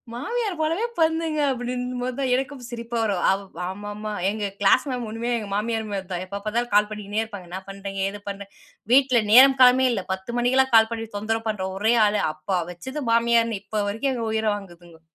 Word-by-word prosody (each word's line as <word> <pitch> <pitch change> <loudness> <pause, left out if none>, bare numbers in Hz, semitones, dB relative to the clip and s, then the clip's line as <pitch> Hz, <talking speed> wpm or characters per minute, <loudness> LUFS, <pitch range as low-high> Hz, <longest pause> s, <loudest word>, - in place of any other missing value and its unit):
மாமியார் 395 - -3
போலவே 330 +9 0
பண்ணுதுங்க 320 -1 +1
அப்டின்னும்போது 250 0 -3
தான் 265 -2 0
எனக்கும் 265 0 -4
சிரிப்பா 235 0 -5
வரும். 200 -5 -1
அவ் 195 +1 -1 0.3
ஆமாமா. 205 +2 -6 0.2
எங்க 210 0 -3
க்ளாஸ் 205 +7 +4
மேம் 245 -2 -3
ஒண்ணுமே 230 +2 -3
எங்க 210 -3 -6
மாமியார் 220 0 -2
மாரி 195 -2 -3
தான், 180 +1 -3
எப்ப 200 +2 -6
பாத்தாலும் 235 +3 -1
கால் 210 0 +4
பண்ணினே 210 0 -3
இருப்பாங்க. 205 -6 -8
என்ன 185 - -4
பண்றீங்க? 195 0 -6
ஏது 205 - -9
பண்ற? 200 0 -6 0.5
வீட்ல 260 -3 +5
நேரம் 265 +3 +8
காலமே 255 +1 +7
இல்ல, 195 -5 -2
10 190 +6 -6
மணிக்கெல்லாம் 260 +1 +2
கால் 220 0 +6
பண்ணி 225 0 -4
தொந்தரவு 225 +2 -2
பண்ற 200 -3 -2
ஒரே 220 +4 +2
ஆளு. 210 0 +1
அப்ப 155 +5 -2
வச்சது 260 - -6
மாமியார்ன்னு 230 -2 +2
இப்போ 215 0 -3
வரைக்கும் 230 +7 -1
எங்க 230 -2 -3
உயிர 220 0 0
வாங்குதுங்கோ. 175 -4 -12
225 Hz, 185 wpm, -24 LUFS, 205-250 Hz, 0.5 s, நேரம்